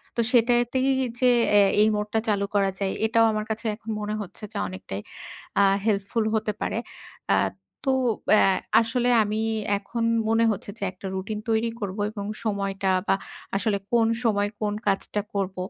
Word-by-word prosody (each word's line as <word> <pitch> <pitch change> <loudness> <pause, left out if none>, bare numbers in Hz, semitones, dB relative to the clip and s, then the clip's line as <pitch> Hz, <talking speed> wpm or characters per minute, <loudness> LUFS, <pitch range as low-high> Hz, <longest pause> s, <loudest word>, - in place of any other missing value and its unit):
তো 235 - +2
সেটাতেই 240 +2 +3 0.3
যে 250 -1 +5 0.2
অ্যা 205 -1 +6
এই 215 - +5
মোডটা 210 +1 -1
চালু 200 -2 +1
করা 195 -1 +3
যায় 195 -1 0
এটাও 225 0 +4
আমার 215 0 -2
কাছে 220 +2 -3
এখন 225 +1 -12
মনে 210 0 -2
হচ্ছে 195 +2 -9
যে 215 - -6
অনেকটাই 185 - -6 0.6
আ - - +6 0.2
হেল্পফুল 210 +1 0
হতে 215 0 0
পারে। - - -1 0.5
অ্যা - - +4 0.5
তো 265 - +3 0.4
অ্যা 215 - +6 0.3
আসলে 245 +2 0
আমি 215 +1 -2 0.4
এখন 230 +3 -4 0.3
মনে 225 +1 +3
হচ্ছে 205 - -5
যে 205 - -6
একটা 190 +1 -8
রুটিন 205 +3 -4
তৈরি 225 +1 +2
করব 200 -2 -4
এবং 205 -2 -6 0.2
সময়টা 195 -2 -1 0.2
বা - - +4 0.4
আসলে 205 0 +1
কোন 230 -2 +4 0.2
সময় 205 -2 +2
কোন 205 -1 0
কাজটা 200 +1 0
করব 195 -1 -2
210 Hz, 165 wpm, -25 LUFS, 200-225 Hz, 0.6 s, অ্যা